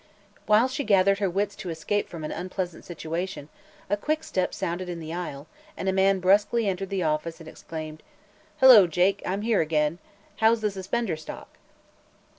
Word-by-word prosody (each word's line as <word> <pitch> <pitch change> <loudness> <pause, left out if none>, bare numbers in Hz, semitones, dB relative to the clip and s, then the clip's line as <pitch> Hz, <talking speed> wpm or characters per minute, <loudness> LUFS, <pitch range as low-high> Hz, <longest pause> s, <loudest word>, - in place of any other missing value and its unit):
While 215 +4 +5
she 275 +3 -3
gathered 195 -3 +3
her 200 -2 +1
wits 200 +3 -1
to 195 -4 -6
escape 165 +6 -2
from 165 -2 -8
an 155 - -4
unpleasant 180 0 -5
situation, 165 -1 -5 0.4
a - - +1
quick 310 +9 -2
step 185 - -1
sounded 175 +2 -4
on 175 - -4
the 160 0 -6
aisle 155 -5 -5 0.3
and 190 - -4
a 190 - +2
man 195 0 +3
brusquely 205 +4 +3
entered 195 0 -2
the 195 -2 -1
office 155 +2 -2
and 165 - -12
exclaimed: 155 -1 -8 0.6
"Hello, 250 -8 +9
Jake; 180 +4 +1
I'm 195 +3 -2
here 225 -2 +2
again. 155 +1 0 0.4
How's 225 0 +3
the 210 -1 0
suspender 195 +1 -2
stock?" 155 0 -9
185 Hz, 175 wpm, -26 LUFS, 165-205 Hz, 0.6 s, Hello